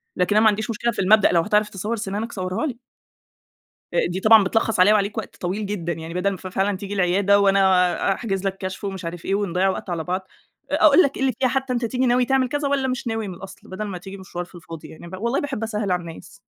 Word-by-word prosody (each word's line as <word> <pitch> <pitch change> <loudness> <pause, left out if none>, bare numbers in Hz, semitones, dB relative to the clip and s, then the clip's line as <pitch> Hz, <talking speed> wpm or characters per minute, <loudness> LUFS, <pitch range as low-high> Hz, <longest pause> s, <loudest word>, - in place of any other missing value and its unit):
لكن 180 +3 +1
أنا 215 - +5
ما 220 - +7
عنديش 215 +3 -2
مشكلة 235 +2 -1
في - - -7
المبدأ، 205 +2 +5
لو 170 - +4
هتعرف 210 +2 +1
تصوّر 210 +3 -3
سِنانك 215 +1 -4
صوّرها 185 +7 -3
لي. 260 -6 -4 1.2
آآ - - +2
دي 180 +2 -3
طبعًا 215 0 +7
بتلّخص 225 -1 0
عليّا 205 +3 +7
وعليك 210 +2 0
وقت 220 - -6
طويل 195 +4 -3
جدًا. 175 -4 -3
يعني 165 0 -7
بَدَل 180 +2 +1
ما 195 - -4
ف 185 - -11
فعلًا 195 +2 0
تيجي 200 +1 -6
العيادة، 200 +2 +3
وأنا 195 -1 +3
أحجز 195 -3 -3
لك 195 0 -2
كشف 190 +1 -6
ومش 195 -2 -5
عارف 170 0 -6
إيه، 195 - 0
ونضيّع 195 -2 +1
وقت 190 - -3
على 165 -2 -2
بعض، 185 +2 -3 0.4
أ - - 0
أقول 365 - +7
لك 280 - -1
إيه - - -3
إلي 265 -1 +2
فيها 260 - +3
حتّى 265 +1 -1
أنت 240 -1 -1
تيجي 250 +3 0
ناوي 245 +1 +3
تعمل 265 0 +1
كذا 290 +2 -1
والّا 275 -1 0
مش 255 0 -3
ناوي 225 -2 -2
من 185 - -6
الأصل، 190 +2 -12
بَدَل 190 +3 -5
ما 195 -3 -5
تيجي 195 +2 -9
مشوار 185 -2 -6
في 180 - -22
الفاضي. 165 -2 -10
يعني 170 +2 -11
ب 185 - -9
والله 235 +7 -1
باحب 275 -6 -4
أسهّل 210 -3 -2
على 180 - +1
الناس. 170 +3 -11
200 Hz, 255 wpm, -22 LUFS, 185-225 Hz, 1.2 s, ما